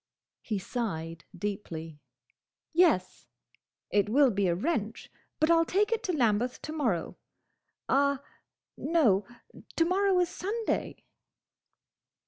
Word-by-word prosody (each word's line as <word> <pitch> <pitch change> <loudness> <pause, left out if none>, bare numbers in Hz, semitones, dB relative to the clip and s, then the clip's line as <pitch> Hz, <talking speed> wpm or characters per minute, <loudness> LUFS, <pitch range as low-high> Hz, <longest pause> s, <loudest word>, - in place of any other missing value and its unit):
He 215 - -2
sighed 175 -6 -4
deeply. 165 -6 -5 0.7
"Yes!—It 205 - -1
will 270 +2 +5
be 200 -2 +1
a 170 - +2
wrench, 225 - -2 0.3
but 310 +2 +3
I 335 - +6
'll 330 - +4
take 405 +6 +1
it 455 - +1
to 370 - 0
Lambeth 245 -4 +1
to 310 - -5
morrow—Ah, 280 - -2 0.5
no! 240 - +2 0.5
To 330 - +3
morrow 380 +2 +2
is 355 -1 +2
Sunday!" 425 +5 -3
250 Hz, 110 wpm, -29 LUFS, 200-335 Hz, 0.7 s, I